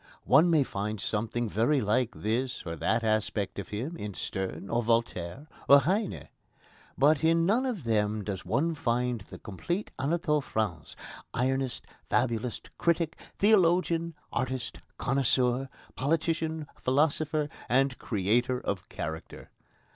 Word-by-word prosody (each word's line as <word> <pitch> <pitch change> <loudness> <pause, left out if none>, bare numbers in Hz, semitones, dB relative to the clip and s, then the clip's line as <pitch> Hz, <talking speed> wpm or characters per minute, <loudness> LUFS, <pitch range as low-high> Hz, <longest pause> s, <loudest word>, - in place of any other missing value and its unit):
One 170 +3 +6
may 160 -4 +5
find 105 -2 -3
something 115 +4 -1
very 115 +8 +2
like 115 +2 +1
this 120 +4 -2
or 85 -1 -4
that 110 +9 0
aspect 110 -2 0
of 100 - -5
him 125 +11 -4
in 105 - -6
Sterne, 95 0 -4
or 120 +3 +1
Voltaire, 115 - -1 0.2
or 140 0 +9
Heine. 195 +6 -1 0.7
But 145 +3 +4
in 165 +1 +4
none 235 +8 +2
of 220 - -3
them 105 -2 +1
does 95 -1 -4
one 165 +4 +1
find 125 -4 0
the - - -8
complete 170 - -4
Anatole 150 +1 +1
France, 105 - -3 0.4
ironist, 130 +1 0 0.3
fabulist, 115 -1 -1
critic, 170 -1 +1 0.2
theologian, 170 -5 +3 0.2
artist, 130 -2 -3 0.2
connoisseur, 130 -1 +1 0.3
politician, 160 +2 0
philosopher, 150 +2 +1 0.2
and 135 +1 +2
creator 120 +5 +1
of 100 -6 -4
character. 80 +1 -6
130 Hz, 125 wpm, -29 LUFS, 110-155 Hz, 0.7 s, or